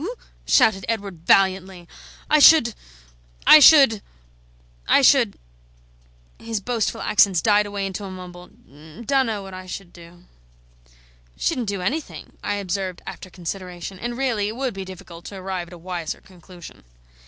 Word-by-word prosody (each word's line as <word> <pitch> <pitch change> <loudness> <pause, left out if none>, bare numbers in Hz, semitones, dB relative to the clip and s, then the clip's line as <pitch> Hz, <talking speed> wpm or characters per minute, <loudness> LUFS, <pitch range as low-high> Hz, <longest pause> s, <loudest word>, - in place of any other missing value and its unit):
shouted 195 -4 +3
Edward, 200 -7 -5
valiantly, 190 -2 +2 0.4
"I 305 - +4
should 285 -6 +7 0.7
I 310 - +9
should 275 -8 +7 0.9
I - - +4
should - - +4 0.5
" - - -34
His 225 -2 -4
boastful 230 +1 -2
accents 200 -5 +3
died 205 +3 +2
away 200 -1 -4
into 195 +1 -5
a - - -7
mumble: 180 -1 -10
"Dunno 215 - -4
what 195 -1 -10
I 185 0 -9
should 180 -1 -8
do." 175 0 -16 1.1
"Shouldn't 255 -8 -2
do 200 -2 -3
anything," 300 - -5
I 205 - -2
observed 190 -2 -4
after 185 - -9
consideration; 180 +1 -7
and 240 +2 -5
really 235 -6 -1
it 215 - -5
would 260 -1 -3
be 195 -1 -7
difficult 180 -2 -12
to 200 - -9
arrive 185 -2 -5
at - - -14
a - - -10
wiser 170 -1 -6
conclusion. 180 - -15
195 Hz, 145 wpm, -22 LUFS, 180-220 Hz, 1.1 s, I